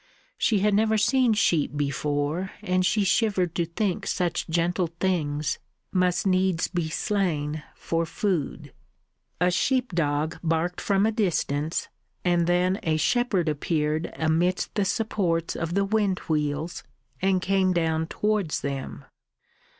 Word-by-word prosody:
She 210 -4 +2
had 210 0 +3
never 220 +1 +3
seen 245 +2 +3
sheep 160 -8 +1
before, 145 +4 -1
and 185 0 +1
she 205 +3 +2
shivered 195 -3 +1
to 170 -1 -1
think 190 +2 -2
such 180 -2 -1
gentle 170 +2 +1
things 155 -6 0 0.3
must 180 -1 +1
needs 185 -2 +2
be 175 -3 -2
slain 155 -5 -1
for 165 0 -1
food. 160 - -2 0.7
A 180 +1 +3
sheep 250 +5 +1
dog 155 -1 0
barked 165 +1 -1
from 200 0 +2
a 220 - +2
distance, 165 -7 -1 0.4
and 175 -1 +2
then 180 +2 +2
a 155 -1 +1
shepherd 200 -1 +1
appeared 155 +1 -1
amidst 165 +3 +1
the 205 - +1
supports 185 -5 0
of 165 +1 -3
the 200 0 +2
wind 200 -2 +1
wheels, 150 +1 -1 0.4
and 190 0 +3
came 190 0 +2
down 160 -2 0
towards 210 -4 0
them. 140 -1 -5
175 Hz, 135 wpm, -26 LUFS, 160-195 Hz, 0.7 s, had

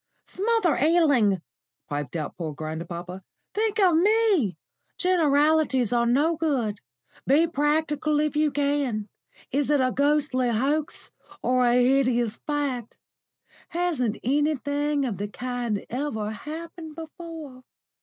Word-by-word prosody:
"Smother 420 -4 +1
Ealing!" 280 - +3 0.4
piped 145 -1 -4
out 155 -3 -4
poor 160 -4 -5
grandpapa. 170 +4 -6 0.3
"Think 435 0 0
of 365 -5 +5
me! 390 - +3 0.4
Generalities 300 - +3
are 235 0 +2
no 295 +7 +2
good. 255 -11 -1 0.5
Be 295 +5 +5
practical 300 -1 0
if 300 0 0
you 300 0 +3
can. 280 -7 -1 0.4
Is 280 +1 0
it 295 -1 +3
a 255 -1 +2
ghastly 280 -3 +2
hoax 285 +7 -1 0.3
or 250 0 +3
a 240 - +3
hideous 250 -3 +2
fact? 280 -6 -2 0.7
Hasn't 315 -11 -1
anything 290 +1 0
of 210 -7 -3
the 205 - -2
kind 240 -2 -3
ever 235 -5 -2
happened 320 +5 -8
before? 320 -4 -9
285 Hz, 115 wpm, -25 LUFS, 235-315 Hz, 0.7 s, of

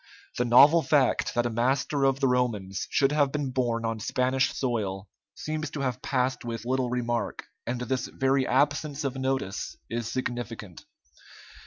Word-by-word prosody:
The 125 - +2
novel 140 +7 +7
fact 140 -5 +2
that 120 0 +2
a 120 - -1
master 135 +4 +1
of 135 0 +2
the 135 - +4
Romans 110 -7 -1
should 135 0 +2
have 145 -2 +2
been 145 -3 -2
born 120 -3 0
on 115 -1 -2
Spanish 130 +4 +1
soil 105 -6 -2 0.3
seems 155 -1 -4
to 145 - -5
have 130 -2 -2
passed 130 -1 -1
with 115 -1 -5
little 130 0 0
remark, 120 -1 -2 0.2
and 120 +1 -2
this 125 +1 -2
very 135 0 +1
absence 145 +2 +1
of 135 -2 -2
notice 130 -7 -2
is 115 -1 -3
significant. 115 -7 -5
125 Hz, 160 wpm, -27 LUFS, 120-135 Hz, 0.3 s, novel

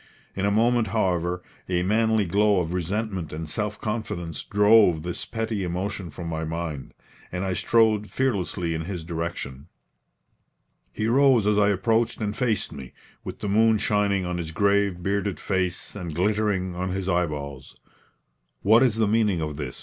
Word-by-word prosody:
In 100 +1 0
a - - +2
moment, 115 +2 +3
however, 90 -4 0 0.3
a 90 -1 +1
manly 110 +2 +2
glow 100 +2 +3
of 85 -1 -2
resentment 95 0 -2
and 80 +1 -5
self 105 +5 -3
confidence 105 -7 -4
drove 105 -6 +4
this 90 0 -4
petty 110 -3 -3
emotion 90 +1 -3
from 85 +3 -8
my 80 -1 -3
mind, 80 -3 -5 0.4
and 90 +1 -3
I 95 - -1
strode 110 0 +2
fearlessly 95 -9 -1
in 80 0 -3
his 90 -3 -5
direction. 80 -4 -5 1.2
He 110 - -3
rose 130 -2 +4
as 105 0 +3
I 105 0 +4
approached 115 +4 +1
and 105 -2 -2
faced 120 -5 0
me, 65 -4 -9 0.3
with - - -8
the - - -2
moon 110 +2 +4
shining 100 -2 +1
on 90 0 -3
his 80 -2 -4
grave, 100 0 +1
bearded 100 -2 -1
face 95 -1 -2
and 85 -6 -6
glittering 95 -1 0
on 90 +1 -2
his 95 0 -3
eyeballs. 75 -7 -2 0.9
"What 110 +4 +6
is 125 -5 +3
the 110 -1 +2
meaning 105 -4 +2
of 75 -2 -3
this?" 70 -4 -6
95 Hz, 165 wpm, -25 LUFS, 85-105 Hz, 1.2 s, What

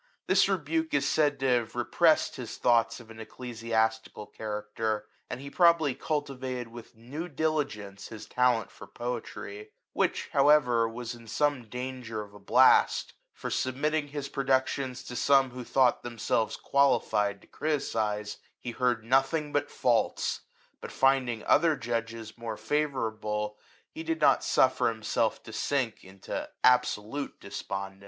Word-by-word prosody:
This 190 +1 +4
rebuke 160 -3 0
is 140 -1 +2
said 145 0 +2
to - - 0
have 120 -3 +1
repressed 155 +7 +3
hi» 125 - -5
thoughts 115 0 +1
of 115 -2 -13
an 110 - -12
ecclesiastical 110 -2 -2
character, 105 0 -3 0.2
and - - -5
he 140 +1 -8
probably 170 -5 +4
cultivated 130 -4 -3
with 120 +1 -12
new 135 +10 -6
diligence 135 - -2
hid 110 -2 -9
talent 125 -2 +1
for - - -12
poetry, 110 -3 -6 0.2
which, - - 0
however, 135 -5 +4
was 120 +1 -6
in 115 -1 -13
some 135 +2 0
danger 125 -3 -5
of 100 -1 -15
a 105 - -13
blast; 125 +6 +4 0.2
for - - -6
submitting 145 +4 0
his 145 -1 -5
productions 130 -1 0
to 125 - -8
some 135 0 +4
who 125 0 -7
thought 125 0 +3
themselves^ 115 -2 -1
qualified 105 -7 +2
to - - -18
criticise, 110 -9 -2 0.2
he 120 - -5
heard 125 -1 0
of - - -22
nothing 135 +5 +1
but 145 0 0
faults; 120 -2 0 0.4
but - - -7
finding 130 -4 +2
other 160 0 +4
judges 115 -2 -4
more 115 -2 -5
favourable, 110 -5 -2 0.4
he 320 - -7
did 330 0 -2
not - - +4
suffer - - +3
himself - - -1
to - - -10
sink 130 -6 -1
into 95 0 -6
absolute 125 +1 +2
despondence. 95 0 -6
125 Hz, 145 wpm, -29 LUFS, 110-140 Hz, 0.4 s, This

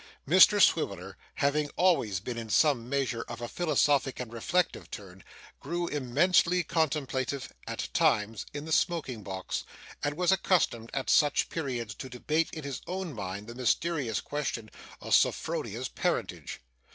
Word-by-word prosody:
Mr - - +7
Swiveller, - - +2 0.2
having 145 +1 +1
always 165 - +2
been 120 +5 -5
in 115 -1 -6
some 125 -2 +3
measure 135 -4 -1
of 120 -1 -7
a 120 - -4
philosophic 145 -4 +1
and 120 -2 -6
reflective 165 +10 -1
turn, 95 -3 -10 0.4
grew 175 0 -2
immensely 170 +6 +2
contemplative, 140 -5 -1
at - - -3
times, 105 0 +2
in 145 +1 -6
the 160 - -6
smoking 155 -9 0
box, 95 -1 -4 0.4
and 145 +1 -1
was 180 +1 +3
accustomed 160 -12 +1
at 135 - -2
such 150 -2 +3
periods 125 -9 -3
to 130 - -8
debate 150 +6 0
in 155 - -7
his 140 -2 -5
own 185 -3 -4
mind 100 -2 -5
the 120 - -8
mysterious 125 - 0
question 125 -7 -4 0.3
of - - -3
Sophronia's - - +1
parentage. - - -3
135 Hz, 145 wpm, -29 LUFS, 115-160 Hz, 0.4 s, Mr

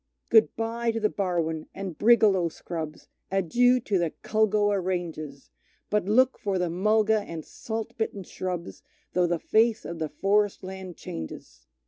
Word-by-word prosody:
Good 220 -1 +5
bye 230 +1 -1
to 225 0 0
the 215 -1 +1
Barwon, 165 -5 -1
and 195 -4 -5
brigalow 205 -6 +4
scrubs, 160 -2 -6 0.2
Adieu 240 +7 +3
to 200 -5 0
the 170 -2 -1
Culgoa 210 -2 +2
ranges, 165 -6 -4 0.4
But 210 -3 +2
look 255 +6 +3
for 200 -2 -1
the 180 -2 0
mulga 215 +4 +3
and 165 -6 -7
salt 225 +1 -5
bitten 205 -3 -2
shrubs, 180 -1 -5 0.3
Though 180 -1 +3
the 170 0 +1
face 220 +5 +2
of 170 0 -6
the 155 -1 -2
forest 200 +6 +1
land 185 -2 -7
changes. 80 -5 -8
195 Hz, 150 wpm, -27 LUFS, 170-220 Hz, 0.4 s, Good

